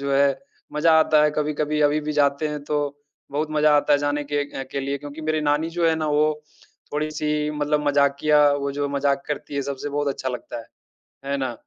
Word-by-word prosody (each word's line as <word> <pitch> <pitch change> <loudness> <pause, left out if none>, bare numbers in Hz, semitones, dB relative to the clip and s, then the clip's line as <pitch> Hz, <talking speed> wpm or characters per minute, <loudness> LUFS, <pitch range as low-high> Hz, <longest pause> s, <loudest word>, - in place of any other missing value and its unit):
जो 140 0 -2
है 140 0 +3 0.3
मज़ा 160 +2 +3
आता 155 -1 +4
है 150 - +4
कभी-कभी 150 0 -1
अभी 150 +1 +3
भी 150 0 -3
जाते 145 +1 +2
हैं, 150 -1 -5
तो 145 -1 -2 0.4
बहुत 150 +2 -1
मज़ा 150 -1 +4
आता 145 - +2
है 145 - +5
जाने 145 0 -1
के 145 -1 -3
के 140 - -1
लिए 140 +1 -2
क्योंकि 145 +2 -9
मेरी 155 0 0
नानी 150 +2 +1
जो 170 0 +1
है 160 - +3
ना, 155 -1 -2
वो 150 0 +1 0.5
थोड़ी-सी 150 0 -1
मतलब 150 0 -1
मज़ाकिया, 145 +1 +4
वो 140 0 -2
जो 145 0 -2
मज़ाक 140 0 0
करती 150 -1 -5
है 140 - 0
सबसे, 140 +1 -4
बहुत 145 0 -1
अच्छा 130 -1 -3
लगता 125 -1 -6
है, 115 - -10 0.6
है 140 0 -1
ना। 130 -3 -2
145 Hz, 210 wpm, -23 LUFS, 140-150 Hz, 0.6 s, है